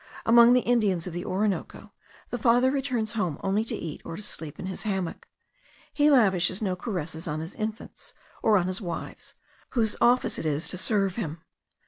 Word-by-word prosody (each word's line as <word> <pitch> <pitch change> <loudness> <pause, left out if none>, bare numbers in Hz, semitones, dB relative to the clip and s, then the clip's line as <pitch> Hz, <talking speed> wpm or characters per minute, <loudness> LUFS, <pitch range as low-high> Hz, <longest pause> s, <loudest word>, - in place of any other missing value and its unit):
Among 235 +1 +7
the 250 - +4
Indians 210 -9 +1
of 180 - -6
the 175 +1 -4
Orinoco, 195 +1 -2 0.4
the 245 - -2
father 245 +3 +4
returns 255 -6 -1
home 180 -10 -1
only 200 +2 +1
to - - -4
eat, 160 -3 -6
or 165 - -6
to 210 - -7
sleep 160 -7 -6
in - - -5
his 190 0 -5
hammock; 190 -5 -3 0.7
he 295 0 +4
lavishes 190 - +3
no 190 -4 -1
caresses 175 -5 -4
on 150 -1 -2
his 165 +4 -6
infants, 215 +1 -6 0.3
or 215 -2 +4
on 180 - +1
his 185 +3 -3
wives, 175 -4 -6 0.4
whose 220 -2 +2
office 245 +1 +3
it - - -5
is 150 +2 -1
to 185 - -3
serve 195 -2 0
him. 160 -7 -4
195 Hz, 185 wpm, -27 LUFS, 175-230 Hz, 0.7 s, Among